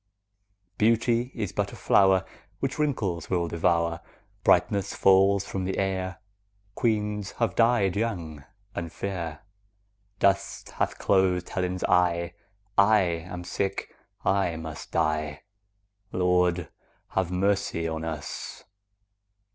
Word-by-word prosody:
Beauty 115 Hz, +3 st, +2 dB
is 105 Hz, -5 st, -3 dB
but 100 Hz, -1 st, -1 dB
a -, -, -9 dB
flower 95 Hz, -1 st, +4 dB
15 95 Hz, -, -20 dB, 0.3 s
Which 135 Hz, +2 st, -2 dB
wrinkles 100 Hz, -, -1 dB
will 85 Hz, -2 st, +1 dB
devour; 85 Hz, 0 st, +1 dB, 0.4 s
Brightness 100 Hz, -1 st, +3 dB
falls 95 Hz, +1 st, +4 dB
from 95 Hz, -, -3 dB
the 95 Hz, +1 st, -2 dB
air; 95 Hz, -2 st, -1 dB, 0.6 s
Queens 105 Hz, -2 st, -1 dB
have 115 Hz, -, 0 dB
died 115 Hz, -6 st, +3 dB
young 85 Hz, -10 st, -3 dB, 0.3 s
and 85 Hz, -1 st, -4 dB
fair; 85 Hz, -5 st, -4 dB, 0.8 s
Dust 100 Hz, 0 st, +1 dB
hath -, -, -1 dB
closed 95 Hz, -2 st, +2 dB
Helen's 90 Hz, -1 st, -2 dB
eye; 85 Hz, -1 st, +2 dB, 0.5 s
I 105 Hz, +1 st, +6 dB
am 90 Hz, 0 st, -3 dB
sick, 95 Hz, +2 st, -3 dB, 0.3 s
I 95 Hz, -4 st, +2 dB
must 80 Hz, -1 st, -7 dB
die— 75 Hz, -2 st, 0 dB, 0.7 s
20 90 Hz, -, -2 dB
Lord, 90 Hz, -1 st, +2 dB, 0.4 s
have 95 Hz, -2 st, 0 dB
mercy 95 Hz, -3 st, 0 dB
on 80 Hz, 0 st, -3 dB
us! 80 Hz, -3 st, -6 dB
95 Hz, 115 wpm, -27 LUFS, 85-100 Hz, 0.8 s, I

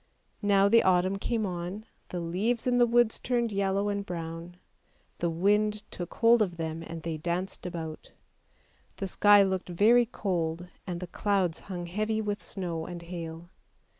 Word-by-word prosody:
Now 200 Hz, -1 st, +4 dB
the 230 Hz, +3 st, +6 dB
autumn 185 Hz, +1 st, +2 dB
came 225 Hz, +1 st, -1 dB
on, 180 Hz, +3 st, -5 dB, 0.2 s
the 180 Hz, -, -4 dB
leaves 195 Hz, +8 st, -1 dB
in 245 Hz, -1 st, +2 dB
the 240 Hz, -, +6 dB
woods 235 Hz, -1 st, +3 dB
turned 240 Hz, -2 st, 0 dB
yellow 200 Hz, 0 st, 0 dB
and 200 Hz, 0 st, -1 dB
brown; 170 Hz, -1 st, -6 dB, 0.6 s
the 170 Hz, -, +1 dB
wind 210 Hz, +5 st, +1 dB
took 175 Hz, -1 st, -6 dB
hold 230 Hz, 0 st, +5 dB
of 180 Hz, -5 st, 0 dB
them, 160 Hz, 0 st, -3 dB
and 165 Hz, -1 st, -7 dB
they 165 Hz, -2 st, -3 dB
danced 175 Hz, +4 st, -3 dB
about. 160 Hz, -3 st, -6 dB, 0.8 s
The 195 Hz, -, -4 dB
sky 205 Hz, +2 st, +6 dB
looked 190 Hz, -1 st, -2 dB
very 225 Hz, +7 st, +5 dB
cold, 175 Hz, -6 st, -2 dB, 0.2 s
and 175 Hz, -1 st, -4 dB
the -, -, -3 dB
clouds 185 Hz, -2 st, 0 dB
hung 175 Hz, -2 st, -4 dB
heavy 215 Hz, +5 st, -1 dB
with 205 Hz, -1 st, -2 dB
snow 170 Hz, -4 st, -4 dB
and 175 Hz, -1 st, -6 dB
hail. 170 Hz, 0 st, -7 dB
185 Hz, 165 wpm, -29 LUFS, 170-210 Hz, 0.8 s, the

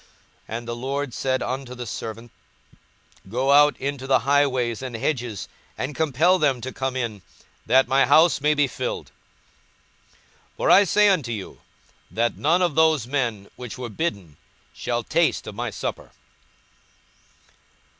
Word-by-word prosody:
42:014:023 115 Hz, -, -3 dB
And 120 Hz, 0 st, -9 dB
the 120 Hz, -, -3 dB
lord 135 Hz, +2 st, -3 dB
said 130 Hz, -1 st, -1 dB
unto 130 Hz, -1 st, -4 dB
the 125 Hz, 0 st, -6 dB
servant, 115 Hz, +1 st, -7 dB, 1.0 s
Go 130 Hz, +6 st, 0 dB
out 145 Hz, +1 st, +6 dB
into 135 Hz, -1 st, -4 dB
the 135 Hz, -, +5 dB
highways 130 Hz, -4 st, +1 dB
and 130 Hz, -3 st, -6 dB
hedges, 115 Hz, -, -3 dB, 0.3 s
and 130 Hz, +4 st, -3 dB
compel 160 Hz, +4 st, +2 dB
them 140 Hz, -5 st, +2 dB
to 130 Hz, +2 st, -6 dB
come 130 Hz, -1 st, -3 dB
in, 115 Hz, -6 st, -3 dB, 0.5 s
that 130 Hz, 0 st, +4 dB
my 135 Hz, +1 st, +3 dB
house 160 Hz, -1 st, +5 dB
may 150 Hz, +1 st, +3 dB
be 145 Hz, 0 st, +3 dB
filled. 130 Hz, -, -5 dB, 1.4 s
42:014:024 -, -, -38 dB
For -, -, +2 dB
I 200 Hz, -, +8 dB
say 210 Hz, +3 st, +4 dB
unto 155 Hz, -11 st, +1 dB
you, 105 Hz, -4 st, -7 dB, 0.5 s
That 115 Hz, +1 st, 0 dB
none 170 Hz, +5 st, +2 dB
of 175 Hz, -4 st, +1 dB
those 160 Hz, -5 st, +3 dB
men 120 Hz, -7 st, -2 dB
which 125 Hz, -1 st, -8 dB
were 125 Hz, -2 st, -5 dB
bidden 100 Hz, -, -4 dB, 0.4 s
shall -, -, -3 dB
taste -, -, +1 dB
of -, -, -7 dB
my -, -, -3 dB
supper. -, -, -5 dB
130 Hz, 155 wpm, -23 LUFS, 120-145 Hz, 1.4 s, I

